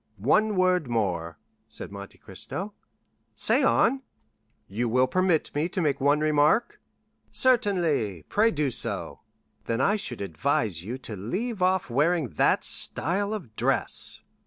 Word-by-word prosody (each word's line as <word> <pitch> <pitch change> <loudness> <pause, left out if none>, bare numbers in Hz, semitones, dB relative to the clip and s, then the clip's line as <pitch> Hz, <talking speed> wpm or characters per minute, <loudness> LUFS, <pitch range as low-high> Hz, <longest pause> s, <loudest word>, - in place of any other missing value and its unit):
"One 200 - +2
word 185 -4 +2
more," 90 -9 -2 0.3
said - - -9
Monte 100 0 -10
Cristo. 190 - -7 0.6
"Say - - +2
on." 265 +3 +3 0.7
"You 115 +5 -2
will 125 +3 +3
permit 185 +1 +1
me 150 +4 -1
to 185 - -3
make 145 -5 0
one 145 +2 +3
remark?" 155 +9 +2 0.5
"Certainly; 170 - +1
pray 220 +2 +3
do 150 - -1
so." - - -3 0.5
"Then 115 +1 -1
I 200 +10 +2
should 125 - -5
advise 100 - -1
you 120 +7 -5
to 120 -4 -7
leave 190 - -4
off 185 -7 +1
wearing 150 +2 +1
that - - +2
style 200 +6 -1
of 170 - -6
dress." - - 0
145 Hz, 135 wpm, -26 LUFS, 115-185 Hz, 0.7 s, on